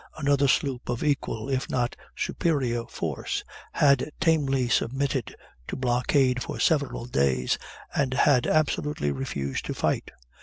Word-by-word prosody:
Another 140 -2 +3
sloop, 130 -1 0
of 120 - -1
equal, 135 -6 -1
if 135 -1 -1
not 120 -1 0 0.2
superior 125 -8 0
force, - - -3 0.3
had 140 -1 +4
tamely 135 -6 +2
submitted 135 +1 0 0.3
to - - -4
blockade 125 +1 +2
for - - -5
several 145 -7 +1
days, 70 - +1 0.3
and 130 -2 0
had 130 -1 +4
absolutely 150 - +1
refused 70 0 -3
to - - -3
fight. - - 0
130 Hz, 125 wpm, -26 LUFS, 120-140 Hz, 0.3 s, had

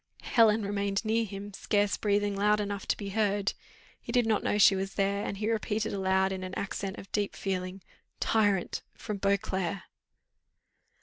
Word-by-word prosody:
Helen 225 -2 +4
remained 200 +1 -1
near 225 +1 +2
him, 200 0 -7
scarce 205 +1 +1
breathing 205 -1 +1
loud 210 +1 +3
enough 200 -1 -3
to - - +1
be 200 -2 -5
heard; 205 -1 +1 0.5
he - - -6
did 245 -1 +3
not 220 -1 +1
know - - +1
she 200 -1 +7
was 195 +1 -3
there, 200 0 +1
and 200 - -3
he 210 +2 -2
repeated 220 0 -1
aloud, 190 -1 +2
in 190 -1 -3
an 185 0 -6
accent 195 -1 -3
of 195 - -11
deep 205 -1 -1
feeling, 185 -1 -3 0.4
"Tyrant! 205 -5 +1
from 210 -2 -5
Beauclerc!" 195 -2 0
200 Hz, 170 wpm, -29 LUFS, 195-210 Hz, 0.5 s, she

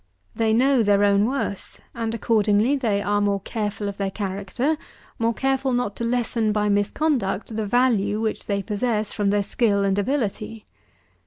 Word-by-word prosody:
They 225 -1 +1
know 255 +3 +4
their 205 -1 +3
own 200 0 +4
worth; 250 -6 -3
and, 230 -1 -3
accordingly, 220 +3 +2
they 215 -7 0
are 205 0 +1
more 200 -1 +1
careful 210 0 -3
of 200 - -5
their 195 -1 -1
character, 200 - -2 0.4
more 230 0 +2
careful 270 0 0
not 245 -5 -1
to - - -3
lessen 230 -2 0
by 210 0 +1
misconduct 205 0 0
the 215 -1 -2
value 215 -3 +2
which 220 -1 -3
they 200 -1 -1
possess 215 0 -1
from 205 -2 0
their 205 0 +2
skill 200 -2 +1
and 195 0 +1
ability. 220 -2 -2
215 Hz, 165 wpm, -23 LUFS, 200-235 Hz, 0.4 s, know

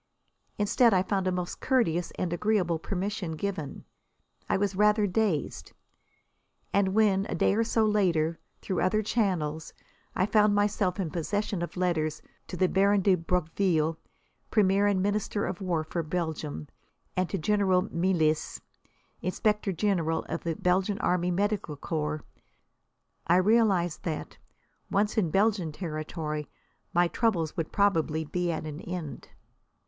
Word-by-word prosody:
Instead, 215 +2 +4
I 185 - +3
found 190 -1 -1
a - - +2
most 180 -1 -3
courteous 180 - +1
and 175 -2 -1
agreeable 180 -4 +1
permission 195 0 -3
given. 160 -4 -4 0.6
I - - +3
was 200 0 0
rather 210 +1 +4
dazed. 190 - -1 1.0
And 195 -1 +2
when, 205 -2 +3
a - - -2
day - - +2
or 225 +3 +2
so 225 -1 +2
later, 170 -6 +1 0.2
through 185 - -1
other 215 +4 +2
channels, 180 -9 -1 0.4
I 185 - +2
found 210 0 +3
myself 205 -2 +1
in 175 -5 -2
possession 200 +2 -2
of 175 - -5
letters 160 -4 0 0.2
to 180 - -6
the 185 - +3
Baron 200 +2 +3
de 195 0 +4
Broqueville, 165 -2 0 0.5
Premier 200 -1 +3
and 190 -2 +2
Minister 205 0 -1
of 185 - -4
War 175 -4 0
for 170 +2 -3
Belgium, 155 - -3 0.5
and 185 -1 0
to 195 - -1
General 190 0 +2
Melis, 170 -3 +1 0.6
Inspector 210 +2 0
General 170 -3 0
of - - -5
the 165 -1 -2
Belgian 185 +4 +1
Army 180 0 +1
Medical 195 -4 -1
Corps, 150 0 -3 1.0
I 170 - +5
realised 190 -4 +3
that, 160 -3 -5 0.5
once 205 +2 +1
in 195 -7 +2
Belgian 195 -2 +1
territory, 155 -2 -4 0.4
my 175 +1 +3
troubles 170 -6 0
would 165 -2 -3
probably 165 -6 +1
be 175 +3 -1
at 160 - -4
an 155 +1 -6
end. 170 -5 -6
185 Hz, 140 wpm, -28 LUFS, 165-205 Hz, 1.0 s, I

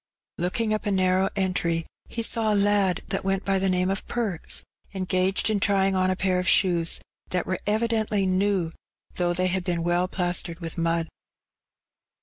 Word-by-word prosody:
'' - - -67
Looking 215 +5 0
up 215 - -2
a - - +1
narrow 185 0 +2
entry, 175 -4 0 0.2
he 230 - -3
saw 225 -1 +1
a - - +2
lad 200 -3 +2
that - - -1
went 195 0 -1
by 195 -1 +2
the 190 0 +1
name 185 +1 +1
of 195 - -3
"Perks," 215 -9 -2 0.3
engaged 185 +1 +1
in 215 -2 +2
trying 195 -1 +2
On 185 0 +2
a 185 - +1
pair 185 -1 +1
of 180 - -2
shoes, 175 -4 +3 0.3
that 180 -1 -1
were 185 - -2
evidently 215 -2 +1
new, 185 -2 +1 0.5
though 175 -1 +1
they 185 +1 +1
had 185 0 +1
been 175 -2 -1
well 175 +1 +1
plastered 175 -2 -2
with 165 -2 -6
mud. 165 -1 0
185 Hz, 180 wpm, -25 LUFS, 180-200 Hz, 0.5 s, shoes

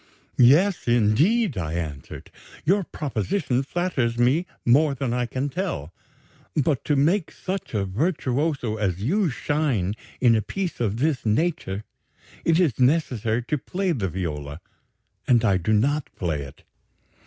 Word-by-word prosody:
'Yes, 150 +9 +5
indeed,' 125 - +3
I 80 -2 -3
answered, 75 -5 -6 0.3
'your 195 +5 +3
proposition 135 - -1
flatters 135 -6 -1
me 135 +9 +2 0.2
more 140 +4 +4
than 130 -2 -2
I 125 0 0
can 130 +3 -2
tell, 140 - -4 0.6
but, 145 -2 +1
to 150 - +2
make 160 +6 +2
such 190 - -5
a 100 -2 +1
virtuoso 135 - -1
as 95 -3 -1
you 185 - +2
shine 130 - 0 0.3
in 120 -3 +5
a 110 - +2
piece 185 - -4
of 110 -3 0
this 145 +1 0
nature, 110 - 0 0.6
it 165 0 +3
is 155 -11 +1
necessary 125 -5 +1
to 145 +5 -2
play 185 +6 -2
the 105 - -1
viola, 75 -4 -4 0.7
and 120 -2 +4
I 100 -3 +3
do 95 +4 -1
not 135 +7 +1
play 80 -6 -2
it. 70 - -14
125 Hz, 145 wpm, -24 LUFS, 105-160 Hz, 0.7 s, Yes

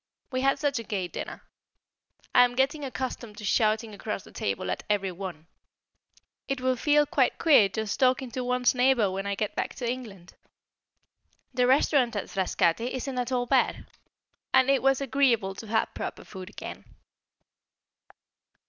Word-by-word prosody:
We 255 -1 -1
had 275 +1 +3
such 280 -3 0
a - - -5
gay 195 -4 -3
dinner. - - -7 0.9
I 245 - +8
am 245 0 +1
getting 275 +3 +1
accustomed 250 -5 -5
to 210 - -7
shouting 215 +1 +1
across 205 -1 -5
the - - -15
table 95 -2 -2
at - - -3
every 200 -2 +1
one; 175 -3 -7 1.0
it 275 -1 -2
will 255 0 +1
feel 295 +4 +3
quite 270 -3 +1
queer 275 -11 +5
just 220 +1 -3
talking 255 -1 +2
to 255 +2 -3
one's 250 0 +2
neighbour 250 -5 +3
when 195 +1 -3
I 200 - -1
get 210 +1 -2
back - - -3
to 245 - -4
England. 220 -8 -6 1.2
The 250 -1 +2
restaurant 260 -2 +3
at 205 - -4
Frascati 190 +4 +1
isn't 260 0 -3
at 250 +1 -2
all 245 -1 +1
bad, 260 +1 +1 0.7
and 260 +1 +5
it 275 - +2
was 270 0 +3
agreeable 250 -7 +2
to 220 +3 -9
have 220 +1 0
proper - - -5
food 185 -1 -9
again. - - -8
245 Hz, 165 wpm, -27 LUFS, 205-260 Hz, 1.2 s, I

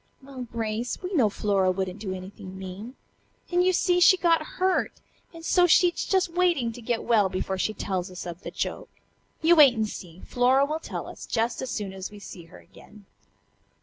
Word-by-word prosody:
"Well, 265 -2 -8
Grace, 225 +1 -3
we 365 +2 -4
know 250 - +3
Flora 200 -2 +1
wouldn't 185 +1 -2
do 200 -2 -5
anything 190 +1 -8
mean. 190 +7 -8 0.6
And, 355 0 +3
you 370 - +4
see, 355 0 +2
she 370 +1 +7
got 335 -2 +3 0.2
hurt, 370 0 +1 0.4
and 330 -1 -11
so 355 0 +4
she's 350 +1 +3
just 380 -2 +2
waiting 340 -9 +1
to 240 +1 -11
get 235 0 -2
well 215 -5 +3
before 190 0 -3
she 215 +3 -1
tells 185 -1 -3
us 180 -1 -8
of 175 0 -7
the - - -6
joke. - - -4 0.5
You 340 +2 +6
wait 285 -6 +7
and 220 -1 0
see. 180 -4 -10
Flora 255 +3 +3
will 305 +2 -3
tell - - -6
us - - -10
just 230 0 -1
as 260 - -4
soon 205 -4 -4
as 190 0 -6
we 210 - -12
see 185 -4 -10
her 165 - -15
again." 210 -1 -17
230 Hz, 200 wpm, -26 LUFS, -, 0.6 s, she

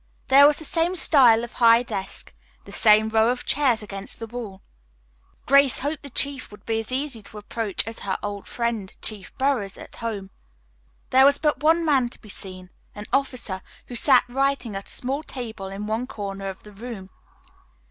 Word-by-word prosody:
There 280 +2 +8
was 295 - +3
the 315 - -3
same 335 +4 0
style 250 -9 +5
of 240 - -8
high 230 0 +5
desk, 195 -5 -4 0.3
the - - -12
same 215 0 +5
row 220 +1 +3
of 245 0 -2
chairs 255 -7 +1
against 195 -1 -4
the 225 - -6
wall. 220 -4 -8 0.8
Grace 275 -1 +4
hoped 290 +3 -2
the 280 - -9
chief 275 +1 0
would 210 0 -15
be 225 -1 -1
as 225 +2 -5
easy 265 -3 -3
to 210 - -12
approach 210 -1 -2
as 225 +1 -6
was - - -8
her 190 - -1
old 205 -1 -5
friend, 235 -5 -3
Chief 210 -3 -3
Burroughs, 260 -8 0
at - - -11
home. 205 -4 -5 0.8
There 265 +1 +6
was 280 0 +5
but 300 -3 0
one 325 +2 +3
man 270 -6 +2
to - - -10
be 215 - -16
seen, 185 -2 -6 0.2
an 210 0 -8
officer, 255 -8 -1 0.3
who - - -8
sat 255 +1 +5
writing 270 -3 -1
at 195 - -6
a - - -4
small 270 +4 -2
table 225 -9 -7
in 195 +2 -6
one 220 +4 -2
corner 195 -4 -6
of 190 - -10
the 210 - -13
room. 205 -3 -9
230 Hz, 195 wpm, -24 LUFS, 205-270 Hz, 0.8 s, There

